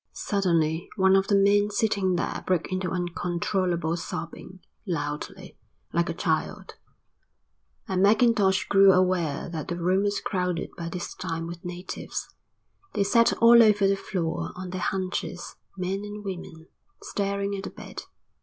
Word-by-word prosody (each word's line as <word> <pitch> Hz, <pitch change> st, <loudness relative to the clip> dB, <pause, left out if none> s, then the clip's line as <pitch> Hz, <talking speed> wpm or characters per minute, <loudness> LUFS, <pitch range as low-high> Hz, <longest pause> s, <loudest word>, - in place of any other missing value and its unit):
Suddenly 170 Hz, -4 st, 0 dB
one 190 Hz, -1 st, +4 dB
of 195 Hz, 0 st, +3 dB
the 200 Hz, -, +3 dB
men 200 Hz, +1 st, +4 dB
sitting 205 Hz, -3 st, +1 dB
there 170 Hz, -, -2 dB
broke 180 Hz, -1 st, 0 dB
into 185 Hz, 0 st, -1 dB
uncontrollable 175 Hz, -1 st, -1 dB
sobbing, 170 Hz, +2 st, -7 dB, 0.3 s
loudly, 150 Hz, -4 st, -4 dB, 0.3 s
like -, -, +1 dB
a -, -, -1 dB
child, -, -, -2 dB, 1.1 s
and 185 Hz, -1 st, 0 dB
Mackintosh 210 Hz, -2 st, +4 dB
grew 195 Hz, -1 st, +6 dB
aware 180 Hz, -5 st, +1 dB
that 160 Hz, -3 st, -5 dB
the 175 Hz, -, -3 dB
room 180 Hz, +3 st, +2 dB
was 205 Hz, 0 st, 0 dB
crowded 180 Hz, -3 st, -2 dB
by 170 Hz, -1 st, -5 dB
this 175 Hz, 0 st, -5 dB
time 165 Hz, -3 st, -4 dB
with 170 Hz, 0 st, -8 dB
natives. 180 Hz, +1 st, -6 dB, 0.6 s
They 205 Hz, -, +3 dB
sat 230 Hz, +3 st, +4 dB
all 235 Hz, 0 st, +9 dB
over 210 Hz, -3 st, +5 dB
the 195 Hz, -, +3 dB
floor 180 Hz, -4 st, -3 dB
on 180 Hz, 0 st, -6 dB
their 185 Hz, -1 st, -4 dB
haunches, 185 Hz, -2 st, -3 dB, 0.2 s
men 185 Hz, +1 st, -2 dB
and 210 Hz, 0 st, -7 dB
women, 175 Hz, -4 st, -7 dB, 0.4 s
staring 200 Hz, 0 st, -2 dB
at 195 Hz, 0 st, -5 dB
the -, -, -4 dB
bed. -, -, -9 dB
185 Hz, 145 wpm, -26 LUFS, 175-200 Hz, 1.1 s, all